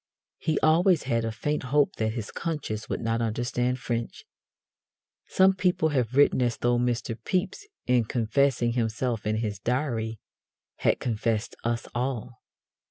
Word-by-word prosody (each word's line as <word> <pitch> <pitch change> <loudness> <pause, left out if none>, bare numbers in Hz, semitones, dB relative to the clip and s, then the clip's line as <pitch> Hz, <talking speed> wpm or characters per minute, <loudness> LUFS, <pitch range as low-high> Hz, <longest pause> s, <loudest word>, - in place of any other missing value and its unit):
He 160 - 0
always 170 +3 +4
had 115 -1 0
a 115 - -1
faint 145 +8 -2
hope 140 +3 +1
that 110 0 0
his 110 -3 -5
conscience 110 -10 -4
would - - -2
not 115 0 0
understand 125 +2 -1
French. 120 -2 -4 1.0
Some 190 0 +4
people 180 -3 +1
have 130 -4 0
written 145 -2 +5
as 120 -2 +1
though 120 0 +2
Mr. 120 -1 -1
Pepys, 190 - -2 0.2
in 125 -2 +3
confessing 120 +2 +1
himself 115 -1 -1
in 110 - +1
his 105 -3 -2
Diary, 115 -2 -1 0.6
had - - +2
confessed 115 -1 -1
us 115 0 -1
all. 125 -1 -3
120 Hz, 145 wpm, -27 LUFS, 115-140 Hz, 1.0 s, written